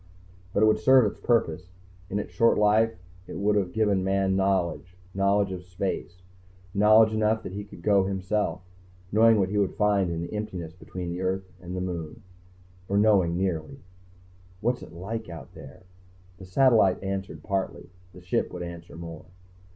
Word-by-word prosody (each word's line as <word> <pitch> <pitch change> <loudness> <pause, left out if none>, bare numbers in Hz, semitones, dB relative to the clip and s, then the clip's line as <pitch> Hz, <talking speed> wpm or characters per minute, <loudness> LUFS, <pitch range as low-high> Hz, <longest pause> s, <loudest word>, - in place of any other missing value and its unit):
But 100 - +2
it - - +7
would 110 - +4
have - - -13
served 130 -6 +6
its - - -23
purpose. 90 -7 +1 0.4
In 100 - -2
its 105 - -4
short 115 - +3
life 110 +2 +3 0.3
it - - -7
would 105 +2 +1
have 95 -3 0
given 105 -4 +1
Man 95 0 +1
knowledge; 95 -2 0 0.2
knowledge 100 0 +2
of 90 -1 -6
space, 90 0 -5 0.5
knowledge 110 +2 +5
enough 110 +1 +1
that - - -6
he 100 +2 -5
could 100 -4 -13
go 100 -2 +4
himself, 95 -2 -1 0.5
knowing 115 +1 +5
what 95 -2 +1
he 105 +1 0
would 100 -2 0
find 100 -3 +2
in 85 0 -3
the 85 - -7
emptiness 95 -6 -5
between 90 0 -7
the 90 +1 -4
earth 95 0 -2
and 90 +1 -6
the - - -2
moon. 85 -4 -5 0.7
Or 100 - +1
knowing 100 -5 +3
nearly. 95 - -2 0.8
What's 120 +4 0
it - - -11
like 105 +6 -6
out 85 -2 -10
there? 90 0 -13 0.6
The 95 - -10
satellite 110 -2 +3
answered 95 0 -4
partly; 95 -3 -3 0.2
the 90 - -14
Ship 90 - -1
would 90 -1 -6
answer 85 -1 -9
more. 85 -1 -8
95 Hz, 175 wpm, -26 LUFS, 90-105 Hz, 0.8 s, it